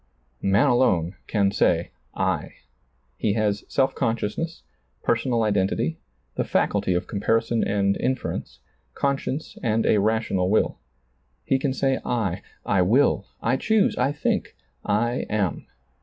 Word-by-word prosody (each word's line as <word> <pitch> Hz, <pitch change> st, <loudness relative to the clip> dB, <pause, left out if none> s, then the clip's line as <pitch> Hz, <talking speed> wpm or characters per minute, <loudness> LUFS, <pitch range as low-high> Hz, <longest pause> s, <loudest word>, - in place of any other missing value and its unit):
Man 100 Hz, +7 st, +3 dB
alone 105 Hz, -, +2 dB
can 100 Hz, -2 st, +2 dB
say -, -, +1 dB, 0.2 s
I. -, -, -1 dB, 0.6 s
He 105 Hz, -, +1 dB
has 105 Hz, -1 st, 0 dB
self 135 Hz, -1 st, +1 dB
consciousness, 115 Hz, +9 st, -2 dB, 0.4 s
personal 115 Hz, 0 st, +1 dB
identity, 95 Hz, -6 st, 0 dB, 0.3 s
the -, -, -1 dB
faculty 90 Hz, -, +1 dB
of 90 Hz, -, -1 dB
comparison 115 Hz, +3 st, 0 dB
and 100 Hz, -1 st, +1 dB
inference, 130 Hz, +1 st, -3 dB, 0.3 s
conscience 140 Hz, +1 st, -2 dB
and 115 Hz, -1 st, +1 dB
a 105 Hz, -, +4 dB
rational 100 Hz, -3 st, +1 dB
will. 110 Hz, -, +1 dB, 0.7 s
He 135 Hz, -, +2 dB
can 135 Hz, 0 st, 0 dB
say 135 Hz, -1 st, +1 dB
I, 110 Hz, -7 st, -1 dB, 0.2 s
I 95 Hz, -, +2 dB
will, 110 Hz, +2 st, +3 dB, 0.2 s
I 125 Hz, +3 st, +2 dB
choose, 220 Hz, +7 st, +2 dB
I 130 Hz, +3 st, +1 dB
think, 150 Hz, -, -1 dB, 0.3 s
I 120 Hz, +4 st, 0 dB
am. 105 Hz, -5 st, -1 dB
110 Hz, 125 wpm, -24 LUFS, 100-130 Hz, 0.7 s, a